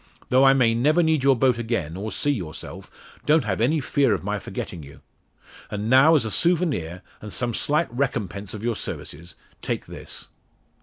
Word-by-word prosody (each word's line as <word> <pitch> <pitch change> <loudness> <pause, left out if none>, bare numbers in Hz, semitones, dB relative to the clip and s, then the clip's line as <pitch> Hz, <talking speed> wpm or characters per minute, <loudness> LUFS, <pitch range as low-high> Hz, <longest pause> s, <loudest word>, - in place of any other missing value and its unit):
Though 130 +2 +5
I 135 - +7
may 120 -4 +3
never 150 +9 +3
need 160 -3 +2
your 135 -1 +5
boat 125 -1 +2
again, 110 -9 -2
or 105 +3 -5
see 145 - 0
yourself, 90 - -6 0.4
don't 155 +1 +4
have 100 -1 -2
any 150 +7 +2
fear 135 -5 +2
of 90 - -7
my - - -2
forgetting 85 - -6
you. 70 -1 -13 0.7
And 105 +2 -3
now, 135 +5 +7
as 135 -7 +2
a 110 - -3
souvenir, 150 - +1 0.2
and 105 - -8
some 120 +2 -1
slight 150 +2 0
recompense 105 -7 -3
of 105 - -8
your 120 -1 0
services, 85 -3 -6 0.3
take - - -3
this." - - -7
120 Hz, 185 wpm, -24 LUFS, 100-140 Hz, 0.7 s, I